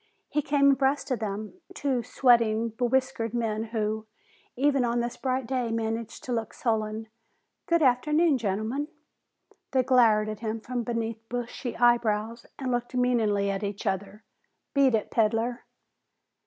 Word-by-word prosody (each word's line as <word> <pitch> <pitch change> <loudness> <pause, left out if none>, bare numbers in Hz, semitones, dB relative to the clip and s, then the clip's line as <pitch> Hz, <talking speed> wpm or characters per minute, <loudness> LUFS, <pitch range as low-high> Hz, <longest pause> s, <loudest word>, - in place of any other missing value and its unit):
He 295 - +1
came 280 0 +4
abreast 275 +1 +1
of 255 - 0
them, 215 - -5
two 265 -4 0
sweating, 230 -2 +3
bewhiskered 245 0 0
men 225 -2 -1
who, 220 -1 -2 0.5
even 275 0 +2
on 240 0 +1
this 240 0 -2
bright 260 -1 -1
day, 250 -1 -1
managed 225 0 -3
to 255 - -5
look 225 -3 -2
sullen. 220 -2 -1 0.6
"Good 335 -2 +3
afternoon, 300 +3 +3
gentlemen." 220 +7 -2 0.9
They 260 -1 +4
glowered 230 -5 +4
at 215 -1 -5
him 225 0 -3
from 245 +2 -3
beneath 230 -1 -3
bushy 245 0 -4
eyebrows, 235 -1 +2
and 260 -2 -3
looked 240 +1 -2
meaningly 220 -5 +2
at 195 0 -3
each 200 0 -4
other. 200 +3 -3 0.5
"Beat 275 -4 +4
it, 215 - -2
peddler." 225 +2 +1
235 Hz, 140 wpm, -27 LUFS, 220-255 Hz, 0.9 s, came